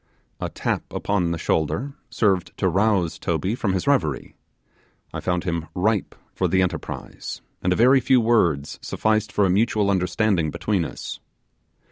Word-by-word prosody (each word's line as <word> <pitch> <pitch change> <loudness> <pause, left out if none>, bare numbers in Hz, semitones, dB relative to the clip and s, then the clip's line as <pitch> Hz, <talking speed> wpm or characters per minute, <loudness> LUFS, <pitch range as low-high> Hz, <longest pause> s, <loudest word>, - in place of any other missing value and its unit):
A - - -3
tap - - -2
upon 95 -4 0
the 85 - -1
shoulder 90 - -1 0.2
served 95 -5 0
to 95 - +1
rouse 95 -2 +1
Toby 95 +4 -1
from 105 -5 -1
his 95 - -1
reverie; 90 - 0 0.8
I - - -3
found 90 -1 -1
him 85 -3 -2
ripe 105 +2 0 0.2
for 95 - 0
the 95 +2 +3
enterprise, 85 -3 -5 0.2
and 90 - +1
a - - +3
very 130 +5 +6
few 130 +1 +4
words 85 -12 +1
sufficed 110 -1 0
for 100 - +2
a - - +2
mutual 105 0 +2
understanding 95 -2 +1
between 95 +2 -1
us. - - -7
95 Hz, 155 wpm, -23 LUFS, 85-110 Hz, 0.8 s, very